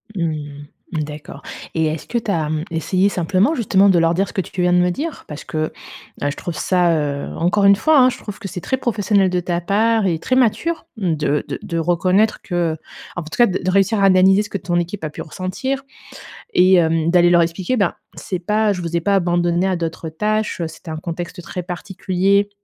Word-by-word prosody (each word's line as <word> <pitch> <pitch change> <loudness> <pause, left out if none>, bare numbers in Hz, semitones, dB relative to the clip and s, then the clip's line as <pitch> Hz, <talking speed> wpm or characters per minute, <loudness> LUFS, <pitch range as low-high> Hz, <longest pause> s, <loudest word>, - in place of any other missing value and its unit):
Mmh, 150 -4 -4 0.3
d'accord 150 -1 -5 0.3
et 160 -1 +1
est-ce 155 0 -3
que 240 - -2
tu 225 - -3
as, 160 -6 0
mmh, 155 0 -2
essayé 180 +4 +1
simplement, 190 - +1
justement, 200 -5 +3
de 185 - +4
leur 165 0 +3
dire 195 +3 0
ce - - -11
que 190 - 0
tu 180 +1 -5
viens 180 0 +3
de - - +4
me 180 0 +3
dire? 295 - -4
Parce 150 -1 -8
que, 155 0 -2 0.5
heu, 145 - +1
je - - -7
trouve 175 - -5
ça, 180 0 +2
heu 145 -2 -2
encore 180 +5 +1
une 200 0 +7
fois, 315 +7 +3
hein, 255 0 +6
je - - -5
trouve 210 -2 -8
que 215 - -6
c'est 180 - -5
très 260 - -1
professionnel 205 -5 +1
de 180 0 0
ta 175 0 -2
part 220 +4 +2
et 170 -4 0
très 255 - 0
mature 260 +7 +1
de 155 -7 0
de - - -5
de 170 - -3
reconnaître 180 +6 +2
que, 175 -3 -1
heu - - -7 0.4
en 180 - -3
tout 155 - -8
cas 240 - +6
de 185 - -2
de 185 - +1
réussir 200 +3 +2
à - - +5
analyser 190 +1 +5
ce 210 - -9
que 200 - -3
ton 175 -2 -3
équipe 175 +3 -3
a - - -3
pu 150 - -8
ressentir 190 - -4 0.7
et 185 +1 +5
hem, 165 -2 +2
d'aller 175 -1 +5
leur 175 - +5
expliquer: 170 +7 -1
«Ben, 200 -5 +1 0.2
c'est 185 - -4
pas 210 +4 +1
je 180 -3 -3
vous 170 0 -4
ai 170 - +1
pas 200 +4 +2
abandonnés 175 0 +1
à 190 - +1
d'autres 165 -1 -4
tâches, 210 +4 -1
heu, 165 - -1
c'était 160 +1 -10
un 155 - -4
contexte 175 +2 -6
très 180 +1 -5
particulier. 190 +2 0
180 Hz, 230 wpm, -19 LUFS, 165-200 Hz, 0.7 s, une